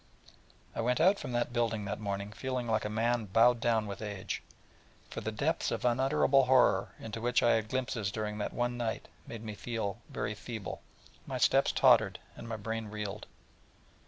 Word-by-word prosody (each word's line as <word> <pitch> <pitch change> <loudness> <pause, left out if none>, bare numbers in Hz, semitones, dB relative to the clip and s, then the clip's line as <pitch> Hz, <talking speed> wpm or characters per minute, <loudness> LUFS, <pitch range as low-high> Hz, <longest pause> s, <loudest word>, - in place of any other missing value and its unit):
I - - -1
went 125 +2 +1
out 190 +4 +5
from 130 - -5
that 120 0 0
building 115 -3 0
that 100 - -3
morning 100 -1 -3
feeling 130 +1 -3
like 110 -1 +1
a - - -1
man 115 +1 +1
bowed 115 +4 +4
down 115 -2 +2
with 100 -1 -6
age, 100 -3 -4 0.7
for - - -5
the - - -3
depths - - 0
of - - -3
unutterable 135 +2 +4
horror 125 -7 +4
into 110 0 -6
which 120 +1 +2
I 120 - +5
had 110 -1 +1
had - - -18
glimpses 120 -5 -1
during 105 0 -3
that 105 - -2
one 120 0 -1
night 115 -2 -3 0.2
made 115 -1 -7
me 110 -1 -5 0.6
very 105 - -3
feeble, 105 -2 -6 0.4
and - - -29
my - - -3
steps - - +4
tottered, - - +5 0.2
and 115 - -9
my 115 - -3
brain 110 +1 -4
reeled. 105 0 -5
115 Hz, 190 wpm, -31 LUFS, 105-120 Hz, 0.7 s, out